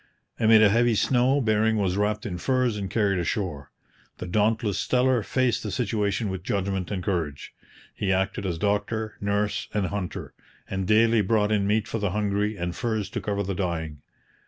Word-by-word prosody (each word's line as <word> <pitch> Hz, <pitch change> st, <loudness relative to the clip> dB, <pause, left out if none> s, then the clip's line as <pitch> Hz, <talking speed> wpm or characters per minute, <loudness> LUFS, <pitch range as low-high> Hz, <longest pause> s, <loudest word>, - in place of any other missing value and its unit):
Amid 110 Hz, -1 st, +6 dB
a 105 Hz, -, +6 dB
heavy 120 Hz, +2 st, +3 dB
snow 130 Hz, +5 st, +2 dB
Bering 110 Hz, -1 st, +2 dB
was 95 Hz, -3 st, 0 dB
wrapped 105 Hz, +1 st, 0 dB
in 90 Hz, -5 st, -4 dB
furs 130 Hz, 0 st, +1 dB
and 100 Hz, -2 st, -4 dB
carried 100 Hz, -3 st, +1 dB
ashore. 85 Hz, -5 st, -3 dB, 0.5 s
The -, -, -6 dB
dauntless 105 Hz, +1 st, +1 dB
Steller 125 Hz, -2 st, +2 dB
faced 130 Hz, 0 st, 0 dB
the 105 Hz, -, -4 dB
situation 105 Hz, -1 st, -1 dB
with 95 Hz, -1 st, -4 dB
judgment 95 Hz, -1 st, -2 dB
and 95 Hz, -3 st, -3 dB
courage. 80 Hz, -8 st, -3 dB, 0.4 s
He 95 Hz, -, -1 dB
acted 95 Hz, +2 st, 0 dB
as 85 Hz, -3 st, -2 dB
doctor, 105 Hz, +3 st, -1 dB
nurse, 100 Hz, 0 st, -1 dB
and 105 Hz, -2 st, +1 dB
hunter, 95 Hz, -1 st, -5 dB, 0.3 s
and 95 Hz, -1 st, -3 dB
daily 115 Hz, +1 st, +4 dB
brought 105 Hz, +1 st, +1 dB
in 100 Hz, -2 st, +1 dB
meat 110 Hz, +1 st, +1 dB
for 115 Hz, -, -3 dB
the 100 Hz, -1 st, 0 dB
hungry 105 Hz, +2 st, -1 dB
and 85 Hz, -1 st, -3 dB
furs 110 Hz, -4 st, -2 dB
to -, -, -3 dB
cover 100 Hz, -1 st, -2 dB
the 100 Hz, +1 st, -3 dB
dying. 80 Hz, -5 st, -3 dB
105 Hz, 180 wpm, -25 LUFS, 95-110 Hz, 0.5 s, Amid